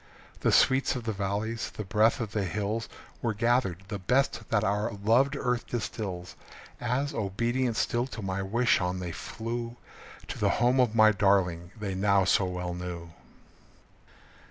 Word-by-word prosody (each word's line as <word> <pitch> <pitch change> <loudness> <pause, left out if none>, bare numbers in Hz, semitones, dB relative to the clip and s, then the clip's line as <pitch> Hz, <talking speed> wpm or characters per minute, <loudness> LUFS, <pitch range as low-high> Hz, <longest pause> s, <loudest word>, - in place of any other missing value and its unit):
The - - +2
sweets 130 0 +4
of 125 - -4
the 110 -1 -2
valleys, 100 +3 -2
the 105 - -3
breath 105 +4 +3
of 110 -4 -3
the 105 -3 -1
hills 105 +5 -2 0.3
Were 115 -3 -1
gathered 115 -5 +1
the 105 -2 -4
best 125 +2 0
that 105 -2 +2
our 105 +3 0
loved 115 +8 +2
earth 125 -3 -1
distills 100 -6 -4 0.4
As, 125 +4 -1
obedient 115 +4 -1
still 120 +2 0
to 115 -5 -7
my 95 0 -2
wish, 115 +5 +2
on 90 0 -1
they 90 -2 -4
flew 115 +6 -5 0.5
To - - -5
the - - +3
home 125 +2 +3
of 120 -3 +3
my 110 -1 +7
darling 95 -4 +2
they 100 -2 -3
now 100 0 +3
so 95 - +3
well 90 -1 -3
knew. 85 -1 -6
105 Hz, 160 wpm, -28 LUFS, 95-120 Hz, 0.5 s, my